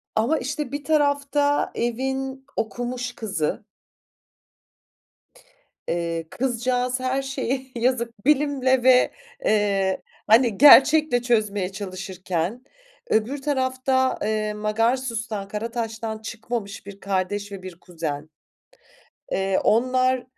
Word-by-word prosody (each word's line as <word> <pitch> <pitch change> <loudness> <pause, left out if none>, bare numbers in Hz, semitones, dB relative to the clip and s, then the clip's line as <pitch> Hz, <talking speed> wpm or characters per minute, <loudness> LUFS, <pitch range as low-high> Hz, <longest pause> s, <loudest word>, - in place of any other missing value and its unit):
ama 240 +9 +2
işte 275 +1 -4
bir 285 0 -4
tarafta 285 -1 +1
evin 265 +3 -2
okumuş 245 +2 -3
kızı 190 -9 -2 2.2
eee, 165 -1 -2
kızcağız 250 0 -1
her 260 +1 0
şeyi 265 -1 -3
yazık 235 -2 -1
bilimle 270 -3 +2
ve 255 -1 +5 0.3
eee 200 -3 +1 0.3
hani 225 -1 +5
gerçekle 290 -2 +7
çözmeye 210 -6 0
çalışırken, 190 +1 -4 0.5
öbür 250 +6 0
tarafta, 260 -1 +1
eee, 215 0 -1
Magarsus'tan, 225 0 -1
Karataş'tan 225 +1 -4
çıkmamış 220 -2 -5
1 200 0 -10
kardeş 200 +1 -2
ve 195 -2 -8
1 185 -2 -9
kuzen. 155 -3 -5 1.0
Eee, 195 0 +1
onlar, 255 +2 +2
235 Hz, 95 wpm, -24 LUFS, 205-260 Hz, 2.2 s, gerçekle